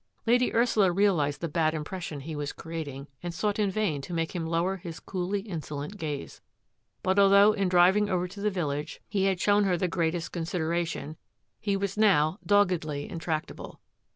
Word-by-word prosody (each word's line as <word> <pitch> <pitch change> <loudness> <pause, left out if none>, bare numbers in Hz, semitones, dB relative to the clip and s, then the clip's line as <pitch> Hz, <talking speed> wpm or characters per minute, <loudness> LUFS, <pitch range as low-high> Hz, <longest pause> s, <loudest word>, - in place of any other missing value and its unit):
Lady 245 +2 +3
Ursula 225 -5 +3
realised 175 -7 +2
the 170 - -1
bad 155 0 +1
impression 155 -1 -5
he 155 +3 -6
was 145 -1 -3
creating, 145 -4 -6
and 175 -1 -5
sought 205 +3 -1
in 205 -2 +2
vain 190 -8 -1
to 170 +5 -6
make 165 +1 -2
him 165 -2 -2
lower 170 +4 0
his 170 -2 -8
coolly 190 +2 -3
insolent 160 -2 -6
gaze. 150 -6 -5 0.6
But 190 +2 +2
although 200 +1 +7
in 195 -3 0
driving 185 +4 +4
over 180 -1 0
to 200 +3 -10
the 210 - +2
village 150 -6 -3
he 195 -2 0
had 190 -2 +1
shown 205 +1 +3
her 180 -2 +2
the 180 - 0
greatest 170 -1 -1
consideration, 165 -2 -2 0.4
he 200 -2 0
was 200 +1 -3
now 190 -5 +3
doggedly 180 -8 +1
intractable. 165 -2 -4
175 Hz, 175 wpm, -28 LUFS, 160-200 Hz, 0.6 s, although